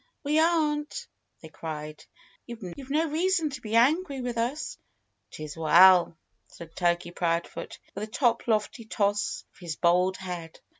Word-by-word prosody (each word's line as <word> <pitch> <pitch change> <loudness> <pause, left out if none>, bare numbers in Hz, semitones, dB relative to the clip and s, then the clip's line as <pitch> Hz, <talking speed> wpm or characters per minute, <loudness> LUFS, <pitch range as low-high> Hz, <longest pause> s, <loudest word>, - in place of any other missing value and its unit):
"We 300 +2 +2
aren't!" 315 +4 +1 0.4
they 160 - -10
cried. 155 -1 -7 0.4
"You've 235 +3 -8
no 310 +3 +1
reason 335 -1 +1
to 265 -2 -7
be 220 -1 -3
angry 280 +4 +3
with 245 -1 -3
us." 245 +6 -3 0.5
"'Tis 155 -1 -8
well," 170 +1 +6 0.3
said 165 -1 -13
Turkey 175 -1 0
Proudfoot 170 -1 -2 0.2
with 210 - -4
a - - -14
toplofty 230 -1 0
toss 205 0 0
of - - -23
his 170 -4 -5
bald 180 +3 +2
head. 175 -3 -7
215 Hz, 140 wpm, -27 LUFS, 170-285 Hz, 0.5 s, well